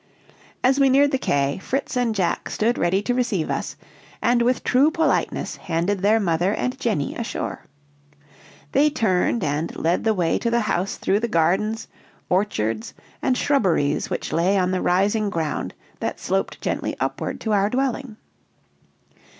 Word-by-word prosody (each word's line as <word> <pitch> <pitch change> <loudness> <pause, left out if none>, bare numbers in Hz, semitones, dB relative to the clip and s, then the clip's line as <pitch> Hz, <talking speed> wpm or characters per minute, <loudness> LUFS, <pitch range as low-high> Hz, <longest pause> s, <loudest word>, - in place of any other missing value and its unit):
As 265 +2 +3
we 275 -1 +5
neared 280 +2 +4
the 265 - 0
quay, 140 - 0
Fritz 270 +8 -3
and 240 -3 +1
Jack 180 -4 -1
stood 230 +3 0
ready 190 +3 +1
to 245 - 0
receive 240 -10 0
us, - - -3 0.4
and 240 0 +2
with 250 +2 +1
true 270 +5 +4
politeness 320 -1 0
handed 175 +5 -1
their 210 +4 +3
mother 180 0 +1
and 255 +1 -2
Jenny 205 -12 -1
ashore. 230 -6 -4 1.1
They 295 +2 +4
turned 225 -5 +1
and 150 +3 -2
led 170 +2 0
the 220 -1 +2
way 175 -3 +1
to 235 - 0
the 235 0 +2
house 195 -3 -1
through 200 - +1
the 235 - -1
gardens, 210 +4 +1 0.4
orchards, 115 - -1 0.3
and 255 -2 +1
shrubberies 180 - +1
which - - -3
lay 180 +5 +2
on 185 -1 +1
the 185 - 0
rising 205 +4 +2
ground 160 -5 -3 0.2
that - - -3
sloped - - -2
gently - - -2
upward - - -3
to 220 - -2
our 200 -1 +3
dwelling. 255 -2 -2
210 Hz, 160 wpm, -23 LUFS, 175-245 Hz, 1.1 s, we